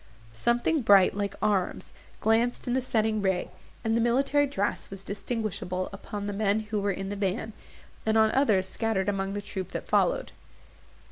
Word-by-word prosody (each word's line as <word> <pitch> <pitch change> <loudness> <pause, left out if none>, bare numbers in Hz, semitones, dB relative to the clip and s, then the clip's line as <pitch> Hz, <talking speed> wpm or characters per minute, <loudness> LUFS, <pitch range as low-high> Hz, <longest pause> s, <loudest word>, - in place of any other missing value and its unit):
Something 240 - +1
bright, 200 -5 +6
like 200 -1 -2
arms, 200 -4 0 0.3
glanced 230 +2 +2
in 245 - 0
the 260 - +2
setting 220 -3 0
ray, 190 -2 0 0.3
and 225 -1 +1
the 230 - +2
military 275 +5 +3
dress 205 -7 -2
was 195 0 -9
distinguishable 200 -3 -3
upon 200 +1 -6
the 205 - -3
men 205 +1 +1
who 215 0 -3
were 200 - 0
in 195 0 -3
the 205 - -3
van, 205 +3 -2 0.5
and 220 0 +2
on 220 0 +5
others 210 -9 +3
scattered 210 -1 -1
among 195 -1 -1
the 205 0 -4
troop 190 -2 -6
that - - -4
followed. - - +2
210 Hz, 175 wpm, -28 LUFS, 195-230 Hz, 0.5 s, bright